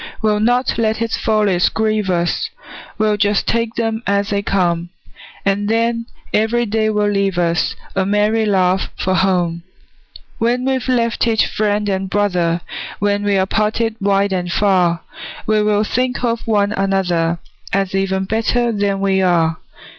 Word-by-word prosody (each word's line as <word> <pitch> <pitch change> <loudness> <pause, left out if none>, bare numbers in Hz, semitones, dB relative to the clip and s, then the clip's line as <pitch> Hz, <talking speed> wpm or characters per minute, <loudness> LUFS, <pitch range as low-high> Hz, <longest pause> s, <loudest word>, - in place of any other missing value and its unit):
We'll 210 -1 +1
not 245 +3 +1
let 220 -1 +1
its 230 0 -1
follies 210 -5 +2
grieve 215 -2 0
us, 175 -1 0 0.5
We'll 215 -1 +1
just 205 0 +1
take 230 0 -1
them 225 -1 -1
as 200 0 +1
they 200 0 +1
come; 175 -4 0 0.6
And 200 +1 0
then 230 +1 0 0.3
every 225 +3 +2
day 220 0 0
will 210 -1 +1
leave 195 -2 0
us 170 -1 +1 0.2
A 190 - +2
merry 210 +3 +1
laugh 190 -3 +1
for 185 - 0
home. 180 -3 +1 0.8
When 245 +2 +1
we've 265 -1 -1
left 235 -2 +1
each 225 -1 +3
friend 210 -1 -1
and 190 -1 -1
brother, 180 -4 +1 0.4
When 205 0 0
we're 200 -2 +2
parted 215 +2 0
wide 200 0 +2
and 180 -2 -2
far, 180 -4 +2 0.4
We 215 0 +2
will 210 0 +2
think 250 +3 -1
of 235 -1 -1
one 205 -2 +2
another, 185 -5 0 0.3
As 195 -1 0
even 190 0 0
better 230 +3 0
than 200 -2 -1
we 195 -1 +2
are. 165 -3 +2
205 Hz, 155 wpm, -18 LUFS, 190-220 Hz, 0.8 s, each